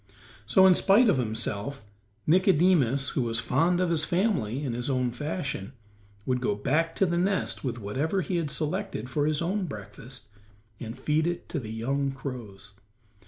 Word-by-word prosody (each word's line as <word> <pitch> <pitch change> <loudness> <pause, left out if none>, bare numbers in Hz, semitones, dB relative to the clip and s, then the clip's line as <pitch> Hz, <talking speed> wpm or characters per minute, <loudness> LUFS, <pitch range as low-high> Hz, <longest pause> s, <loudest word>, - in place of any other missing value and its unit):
So, 190 - +6
in 190 - +8
spite 205 +6 +5
of 180 - +3
himself, 115 +2 -3 0.4
Nicodemus, 160 - +3
who - - -1
was 115 -1 0
fond 175 +8 +2
of 180 -2 +1
his 160 -2 +3
family 160 - 0
in 125 - -2
his 120 +3 -3
own 130 -2 +1
fashion, 140 - -4 0.5
would 125 -1 0
go 105 -5 0
back 155 +10 0
to 195 - +3
the 170 -1 0
nest 190 +1 0
with 125 -3 -2
whatever 135 - -1
he 180 0 -2
had 165 -3 -1
selected 140 -6 -2
for 145 +1 +1
his 155 +1 0
own 190 +2 -1
breakfast, 125 +1 -9 0.5
and 115 -1 -7
feed 155 +2 +1
it 175 0 -3
to 155 - -2
the 110 -5 -7
young 135 +5 -1
crows. 120 -7 -8
140 Hz, 170 wpm, -27 LUFS, 120-170 Hz, 0.5 s, in